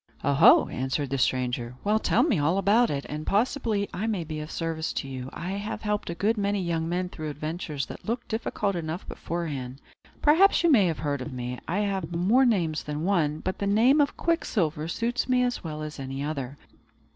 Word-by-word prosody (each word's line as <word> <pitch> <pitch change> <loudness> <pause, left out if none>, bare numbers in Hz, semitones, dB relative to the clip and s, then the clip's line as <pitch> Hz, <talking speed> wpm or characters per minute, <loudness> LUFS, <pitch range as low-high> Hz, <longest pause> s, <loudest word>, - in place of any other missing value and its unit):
"Oho!" 140 -1 +6
answered 130 +1 -2
the 135 - 0
stranger. 125 -1 0
"Well, 210 +2 +2
tell - - +3
me 250 - +2
all 160 +6 +2
about 210 +5 +4
it, 140 -1 -3
and 150 +1 -5
possibly 220 -1 +1
I 200 +6 -2
may 205 -6 -1
be 155 -1 -5
of 150 0 -6
service 165 -1 -3
to 135 - -3
you. 130 -1 -6
I 180 +3 -5
have 200 +3 -4
helped 210 -3 -1
a 170 - -3
good 210 +5 +1
many 200 0 0
young 165 -2 -1
men 180 +1 -1
through 155 -3 -6
adventures 155 -1 -4
that - - -10
looked 235 +2 -3
difficult 210 -3 -2
enough 165 +1 -4
beforehand. 140 -7 -4 0.4
Perhaps 345 +6 +5
you 340 - +5
may 210 -9 +5
have 165 - -1
heard 145 -3 -2
of 135 - -5
me. 125 0 -5
I 190 +5 0
have 190 -5 -2
more 220 +10 +4
names 170 -9 +1
than 150 +1 -4
one; 160 -5 +1
but 185 - -3
the 200 - -1
name 240 +9 +5
of 285 - 0
Quicksilver 170 - 0
suits 235 +8 -1
me 250 0 +3
as 245 0 -1
well 155 -2 -5
as 150 -1 -7
any 135 +1 -4
other. 140 -3 -4
170 Hz, 205 wpm, -27 LUFS, 150-210 Hz, 0.4 s, Oho